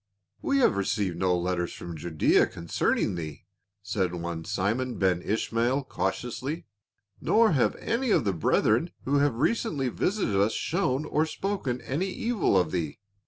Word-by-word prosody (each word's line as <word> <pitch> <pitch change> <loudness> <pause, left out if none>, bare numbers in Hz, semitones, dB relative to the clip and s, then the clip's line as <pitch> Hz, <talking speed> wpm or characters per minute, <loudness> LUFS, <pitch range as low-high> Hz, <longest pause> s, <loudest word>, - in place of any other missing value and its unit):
"We 280 - +1
have 245 - +4
received 100 -2 -1
no 90 -1 +2
letters 85 0 -1
from 85 -1 -7
Judaea 80 0 +2
concern 85 -1 -1
ing - - 0
thee," 80 -4 -6 0.4
said 95 -4 -1
one 85 -1 -4
Simon 115 +5 -1
Ben 90 -2 +2
Ishmael 115 +6 0
cautiously, 125 - -3 0.3
" 105 -2 -39
nor 225 -1 +4
have 135 -6 +2
any 245 +2 -1
of - - +4
the 100 - +1
brethren 80 - +2 0.2
who 140 +2 +2
have 140 -4 +2
recently 145 - 0
visited 190 - 0
us 105 +2 +2
shown 155 - 0
or 155 +2 +1
spoken 160 -10 -2
any 155 +9 -2
evil 215 - +1
of 90 -4 +2
thee. 80 -5 -2
115 Hz, 160 wpm, -27 LUFS, 90-145 Hz, 0.4 s, have